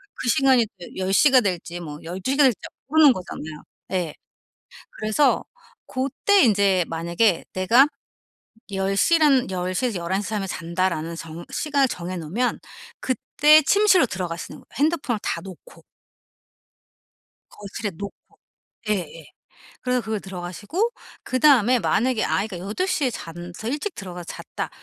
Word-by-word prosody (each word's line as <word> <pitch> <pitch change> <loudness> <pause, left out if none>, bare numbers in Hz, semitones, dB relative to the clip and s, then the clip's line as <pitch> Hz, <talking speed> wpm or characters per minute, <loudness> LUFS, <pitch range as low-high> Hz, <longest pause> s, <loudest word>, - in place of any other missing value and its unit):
그 245 - -3
시간이 255 -2 +4
또 175 - -8
10:00 195 +9 +3
가 255 -2 +7
될지 175 -2 -3
뭐 150 -3 -7
12:00 190 - -3
가 290 - +6
될지 255 -6 +3 0.3
모르는 305 -1 +6
거잖아요. 160 -6 -8 0.3
예. 175 -5 -1 0.8
그래서 215 +7 +2 0.4
고때 275 +10 +1
인제 200 -5 +3
만약에 170 +4 +1
내가 230 +10 +5 0.9
열 195 0 -1
시란 295 - +4
10:00 185 +6 -1
에서 210 -7 -2
11:00 190 +4 -2
사이면 200 -3 -2
잔다라는 170 -1 -2
정 165 +1 -8
시간을 280 -3 +1
정해 180 -3 -5
놓으면 185 +10 -1 0.4
그때 300 +4 +4
침실로 380 -2 +4
들어가시는 175 -4 -5
거예요 - - -23
핸드폰을 290 -6 +1
다 - - -2
놓고. 195 - -13 1.7
거실에 205 0 -6
놓고 200 +3 -7 0.7
예예. 165 -6 -3 0.6
그래서 250 -1 0
그걸 220 -2 -3
들어가시고. 195 - -3 0.3
그다음에 255 -3 +4
만약에 240 0 +1
아이가 195 -2 -1
8 210 - -2
시에 280 -8 +1
잔 175 -4 -8
서 220 - -6
일찍 295 +10 -3
들어가서 180 -2 -8
잤다. - - -6
205 Hz, 270 characters per minute, -23 LUFS, 180-265 Hz, 1.7 s, 가